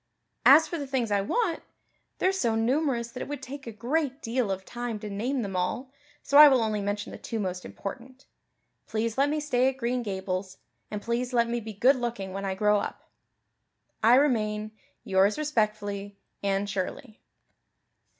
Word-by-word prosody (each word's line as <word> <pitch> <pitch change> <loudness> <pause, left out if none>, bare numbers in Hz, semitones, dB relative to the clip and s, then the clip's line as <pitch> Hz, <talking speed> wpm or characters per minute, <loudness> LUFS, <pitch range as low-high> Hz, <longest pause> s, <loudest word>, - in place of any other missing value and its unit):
As 310 +4 +8
for 335 +1 -4
the 285 - -4
things 255 -5 -1
I 200 -1 +3
want, 350 - 0 0.6
they're 375 - +2
so 240 -13 0
numerous 240 0 0
that 250 - -7
it - - -4
would 290 -1 -6
take 270 0 -8
a - - -4
great 270 +5 -1
deal 235 -1 -1
of 190 0 -3
time 240 -2 -4
to 210 0 -7
name 240 +6 -1
them 195 -2 -5
all 215 +9 -2 0.3
so 280 +1 +5
I 300 - +12
will 260 -4 +4
only 215 -2 -1
mention 205 +1 -3
the - - -9
two 225 - -4
most 185 -2 -3
important. 255 +6 -8 0.6
Please 225 0 -1
let 275 +2 +3
me 305 +1 0
stay 260 -3 +2
at 265 - -6
Green 250 0 -1
Gables; 190 -3 -4 0.3
and 210 -1 -5
please 240 +2 -2
let 235 -1 +3
me 240 +1 -1
be 220 -1 -7
good 255 +7 +4
looking 230 -6 -4
when 195 +1 -4
I 190 -1 -2
grow 210 +1 +3
up. - - -7 0.9
I 230 +3 +6
remain, 215 -6 +1 0.3
"Yours 195 +2 +3
respectfully, 210 -8 -1 0.2
Anne 195 0 0
Shirley. 200 +4 -5
230 Hz, 180 wpm, -27 LUFS, 205-265 Hz, 0.9 s, I